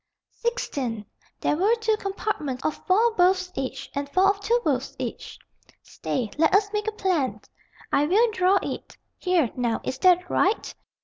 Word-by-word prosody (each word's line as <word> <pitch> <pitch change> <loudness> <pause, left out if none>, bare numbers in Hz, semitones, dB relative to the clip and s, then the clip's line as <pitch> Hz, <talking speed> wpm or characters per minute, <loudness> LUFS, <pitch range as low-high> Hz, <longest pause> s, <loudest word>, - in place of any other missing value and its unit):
"Sixteen. 270 - -3 0.4
There - - +1
were 400 +8 +3
two 445 -1 +1
compartments 385 -10 -3
of 310 - -2
four 440 +5 +4
berths 365 -1 +2
each, 265 -1 -4
and 280 0 -3
four 375 +6 +4
of 400 - -7
two 465 +4 +1
berths 270 -3 -1
each." - - -6 0.5
"Stay, 235 -6 -4
let 320 +3 +4
us 405 +1 +2
make 420 +1 -2
a - - +1
plan. 365 -10 -1 0.5
I 290 +1 +3
will 440 +7 +3
draw 375 -1 +3
it. - - -6 0.2
Here, 350 - +1
now, 240 -2 0
is 260 - -4
that 360 +1 +4
right?" 395 +4 +1
370 Hz, 165 wpm, -25 LUFS, 280-420 Hz, 0.5 s, four